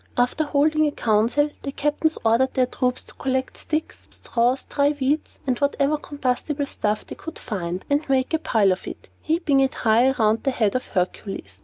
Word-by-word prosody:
After 250 +5 +1
holding 305 +1 +2
a - - 0
council, 235 +6 +2
the 275 - -4
captains 295 +3 0
ordered 235 +4 +3
their 255 - +4
troops 250 0 -1
to - - -15
collect 260 0 -2
sticks, 310 +1 -4
straws, 245 +2 0
dry 285 +1 +1
weeds, 280 +4 -1
and 255 -3 0
whatever 285 +1 +2
combustible 285 0 -2
stuff 210 -5 -2
they - - -8
could 325 - -8
find, 180 -5 -4
and 285 +1 0
make 265 +2 +1
a 320 - +3
pile 210 -10 +2
of 185 - -3
it, - - -9
heaping 310 -3 +1
it 270 -1 +2
high 230 +3 +4
around 225 -4 +2
the 275 - 0
head 220 -6 +1
of 255 - -2
Hercules. 180 - -3
260 Hz, 185 wpm, -23 LUFS, 230-290 Hz, -, their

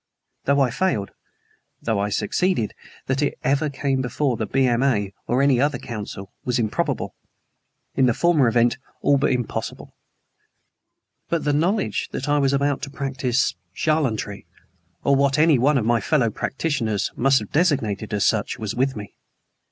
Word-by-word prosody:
Though 140 +1 +3
I 130 -3 +2
failed, 130 - -1 0.7
though 110 -3 -1
I 100 +1 0
succeeded, 110 - 0 0.3
that 130 +2 0
it 145 - 0
ever 140 +3 +1
came 135 -1 -1
before 130 +1 0
the 110 -1 -3
B.M.A., 120 -5 +1
or 125 +3 +2
any 135 -3 +4
other 145 -2 +1
council, 105 -4 -7
was 125 0 0
improbable; 110 -3 -1 0.8
in 130 - +3
the 120 - +2
former 170 -7 +3
event, 120 +2 +2 0.2
all 140 -1 +4
but 140 - +2
impossible. 125 -3 -3 1.4
But 170 -1 0
the 145 - +1
knowledge 170 - 0
that 135 - -3
I 145 0 +3
was 135 -1 +2
about 140 0 +1
to - - -5
practice 135 -2 -1 0.2
charlatanry, 125 -10 -1 0.6
or 140 - +4
what 140 +1 +2
any 155 -3 +5
one 140 +4 +3
of 115 - 0
my 120 0 +2
fellow 130 -8 +2
practitioners 115 -5 -1
must 135 +2 +4
have 105 -4 -4
designated 120 - +1
as 105 -1 +1
such, 110 +2 +1
was 110 -4 -4
with 130 +2 0
me. 105 -2 -8
130 Hz, 160 wpm, -23 LUFS, 115-145 Hz, 1.4 s, any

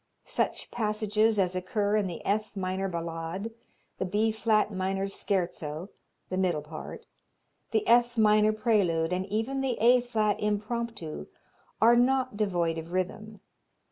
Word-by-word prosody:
Such - - -2
passages 215 -1 +1
as 185 -2 +1
occur 200 +3 0
in 210 -2 +1
the 175 - -7
F 210 0 -1
minor 190 +1 -1
Ballade, 170 +4 -4 0.5
the - - 0
B 210 +4 +1
flat 215 -1 +1
minor 190 +1 -1
Scherzo 180 -4 -2 0.4
the 185 - -2
middle 175 -5 +1
part 155 +1 -8 0.6
the 430 -2 0
F 240 0 +4
minor 215 0 +5
Prelude, 195 -7 +1
and 185 +1 -2
even 225 +7 -1
the 260 -3 -1
A 245 +3 +6
flat 215 -4 0
Impromptu, 210 - -3 0.5
are 230 +3 +6
not 255 -1 +2
devoid 175 -6 0
of 165 +1 -9
rhythm. 200 +3 -3
205 Hz, 140 wpm, -28 LUFS, 185-220 Hz, 0.6 s, A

